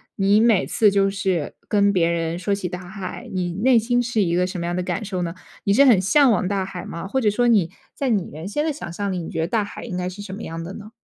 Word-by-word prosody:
你 200 +2 +3
每 225 -4 +4
次 215 -2 +3
就 195 0 +2
是 190 -6 -1
跟 200 -1 +3
别 170 -3 +2
人 165 0 -1
说 200 +2 0
起 185 -3 -4
大 180 -1 -7
海， 190 -1 -7
你 180 -2 -1
内 240 +6 +3
心 245 +2 +2
是 235 -3 0
一 170 -2 +1
个 180 0 +2
什 185 -2 -5
么 170 - -3
样 175 - -2
的 180 - -1
感 180 +4 -3
受 190 -3 -3
呢？ 170 0 -3 0.3
你 200 - +3
是 275 +6 +6
很 235 -9 +6
向 250 +7 +4
往 185 -3 +1
大 195 -1 0
海 185 -2 -7
吗？ 170 +3 -6
或 265 +6 0
者 215 -4 +3
说 240 +4 +1
你 195 -8 +3 0.2
在 275 -2 -2
你 200 -6 0
原 160 +5 -7
先 295 +9 -1
的 315 - +1
想 175 - -7
象 200 +1 -2
里， 185 - -2
你 160 - -6
觉 160 - -2
得 165 - 0
大 220 0 +1
海 - - -9
应 185 -7 -5
该 180 0 -2
是 190 +3 -7
什 195 -2 -7
么 220 - -7
样 165 0 -5
的 185 +3 -7
呢？ 215 +1 -10
195 Hz, 315 characters per minute, -22 LUFS, 180-215 Hz, 0.3 s, 是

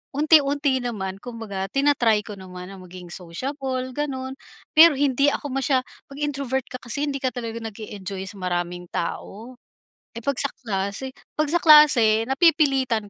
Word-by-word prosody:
Unti-unti 285 -2 +3
naman 200 -6 -4
kumbaga 215 -5 -5
tina-try 240 -4 +2
ko 210 - -8
naman 180 -1 -9
na 195 - -10
maging 180 -1 -11
sociable 255 - -4
ganun, 265 -1 -4 0.4
pero 325 -1 +9
hindi 275 0 +2
ako 290 - -4
masya 265 0 +1
pag 275 +2 -16
introvert 275 -3 -1
ka 255 - -6
kasi 255 +4 -3
hindi 275 -1 -3
ka 260 - 0
talaga 230 -1 -5
nag-e-enjoy 200 -4 -7
sa 205 - -11
maraming 175 -1 -3
tao. 225 +8 -5 0.6
Eh, 230 - -6
pag 280 -2 0
sa 280 - +3 0.2
klase 200 +4 -3 0.3
pag 305 -1 +1
sa 345 - +3
klase 255 -9 +6
napipilitan 270 - +2
255 Hz, 150 wpm, -23 LUFS, 200-280 Hz, 0.6 s, pero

